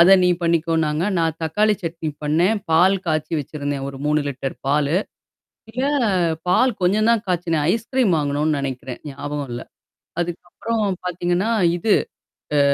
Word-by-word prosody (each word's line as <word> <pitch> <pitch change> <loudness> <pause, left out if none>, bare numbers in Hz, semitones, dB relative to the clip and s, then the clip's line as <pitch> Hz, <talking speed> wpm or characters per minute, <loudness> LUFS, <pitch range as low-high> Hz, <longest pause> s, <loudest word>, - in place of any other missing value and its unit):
அத 185 +3 +8
நீ 180 - +4
பண்ணிக்கோ 165 -1 +1
நாாங்க. 150 +3 0
நான் 165 -1 0
தக்காளி 210 +7 +2
சட்னி 165 -1 -3 0.2
பண்ணேன், 175 +9 +2
பால் 185 +4 +5
காய்ச்சி 155 0 -1
வச்சிருந்தேன் 145 -1 -4
ஒரு 135 -1 -8
3 150 0 +2
லிட்டர் 135 0 -4
பால். 145 +1 +2 0.8
இல்ல 255 +3 -1 0.6
பால். 250 +7 +4
கொஞ்சம் 210 +5 +3
தான் 230 -2 +1
காய்ச்சனே. 170 -3 0
ஐஸ்கிரீம் 230 -4 +1
வாங்கணும்னு 145 +1 0
நெனைக்கிறேன். 130 -2 -5
ஞாபகம் 145 0 -5
இல்ல. 120 - -5 0.6
அதுக்கப்புறம் 175 +6 -3 0.2
பார்த்தீங்கன்னா, 180 +4 0 0.3
இது. 205 +4 +3 0.6
அ 145 - +4
165 Hz, 135 wpm, -21 LUFS, 150-190 Hz, 0.8 s, அத